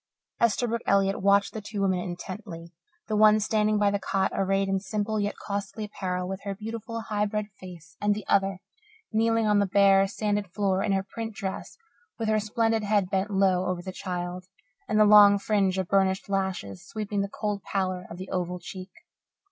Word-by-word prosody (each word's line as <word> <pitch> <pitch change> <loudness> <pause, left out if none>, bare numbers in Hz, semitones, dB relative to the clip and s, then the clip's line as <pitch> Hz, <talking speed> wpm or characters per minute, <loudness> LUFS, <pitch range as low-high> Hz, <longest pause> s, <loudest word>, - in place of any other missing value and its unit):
Esterbrook 235 +1 +2
Elliott 195 -1 +2
watched 200 +1 +3
the 220 - -5
two 205 0 -6
women 185 -2 +1
intently 175 -1 -7 0.3
the 215 - -1
one 215 0 +6
standing 215 0 +1
by 205 -1 +3
the 200 - 0
cot, 195 0 0
arrayed 195 0 +1
in 195 0 +1
simple 210 +2 -2
yet 205 0 -1
costly 200 +1 -4
apparel, 180 -3 -3
with 190 +1 -5
her 200 -1 -4
beautiful, 225 +2 -6
high 210 -1 -1
bred 210 0 -2
face, 170 -3 -12
and 205 0 +2
the 210 - -6
other, 195 -1 +1 0.5
kneeling 225 0 +2
on 210 -1 +3
the 200 - +2
bare, 195 0 +5
sanded 205 -2 -2
floor 195 -1 0
in 200 - 0
her 195 0 +1
print 225 +2 -6
dress, 190 -1 -5 0.4
with 225 -3 -2
her 215 0 +3
splendid 225 +1 0
head 205 -2 +1
bent 195 +1 0
low 190 -2 +2
over 180 -1 -2
the 185 - -5
child 180 -1 -5 0.4
and 215 0 +1
the 215 - +7
long 205 -1 +8
fringe 195 -2 +1
of 190 -2 -1
burnished 190 0 +1
lashes 190 - -3
sweeping 210 -2 -3
the 200 - -2
cold 210 -1 -3
pallor 185 -2 -2
of 170 - -8
the 185 +1 -8
oval 180 0 -2
cheek. 185 +2 -9
200 Hz, 190 wpm, -27 LUFS, 190-210 Hz, 0.5 s, long